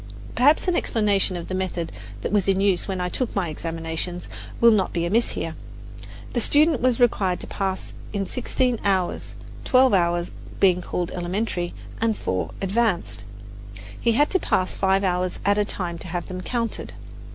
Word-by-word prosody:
Perhaps 290 +9 +4
an 360 - +2
explanation 205 - +1
of 170 - -6
the - - -5
method 185 -3 -2 0.3
that - - -2
was 205 -2 +2
in 195 -1 +3
use 195 -3 +2
when 190 -2 -2
I 180 - 0
took 240 +6 -3
my 185 -5 0
examinations 165 +2 -4 0.3
will 235 0 +7
not 205 -4 +1
be 170 0 0
amiss 225 +7 +2
here. - - -3 0.8
The 240 - +1
student 300 +2 +4
was 255 -1 +2
required 195 -7 +2
to - - -2
pass 190 -1 -3 0.2
in 200 -2 -2
sixteen 250 +1 -1
hours 190 -3 0 0.3
twelve 255 -1 +4
hours 175 -2 +2 0.3
being 180 -2 +4
called 175 0 -3
elementary 175 0 -2 0.3
and 225 -1 +1
four 95 0 -2
advanced. 185 - 0 0.8
He 230 - +3
had 290 +6 +3
to 375 - +3
pass 185 - 0
five 195 0 +2
hours 180 -1 0
at 205 +1 +3
a 205 - +2
time 175 -4 -3
to 185 - -7
have 175 0 -3
them 185 0 -5
counted. 230 +3 -2
190 Hz, 175 wpm, -24 LUFS, 175-230 Hz, 0.8 s, will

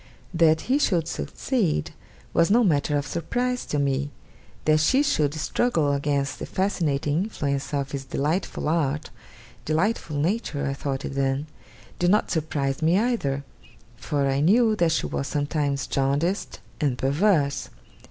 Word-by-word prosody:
That 160 -2 +4
he 265 +3 +1
should 170 - +1
succeed, 180 - -1 0.4
was 170 - +3
no 235 +4 +5
matter 150 -5 +2
of 145 - -2
surprise 245 +11 -2
to 150 - -1
me. 140 0 0 0.6
That 155 0 +4
she 265 - +3
should 150 - +1
struggle 160 -2 +1
against 140 0 -1
the - - -5
fascinating 165 -4 0
influence 140 -10 -3
of 140 -2 -2
his 135 -1 -4
delightful 150 +6 -2
art 150 -2 0 0.5
delightful 160 +1 0
nature 155 -3 -1
I 140 - -1
thought 140 -1 -3
it - - -4
then 135 +1 0 0.5
did 175 - +3
not 210 +3 +2
surprise 145 -4 -1
me 165 +4 +3
either; 200 - 0 0.5
for 140 -2 -1
I 135 0 +1
knew 215 +8 +4
that 170 -4 +3
she 160 - 0
was 135 - -3
sometimes 145 -2 -1
jaundiced 140 +9 -1 0.2
and 140 -5 +1
perverse. 145 +1 +1
150 Hz, 145 wpm, -25 LUFS, 140-180 Hz, 0.6 s, no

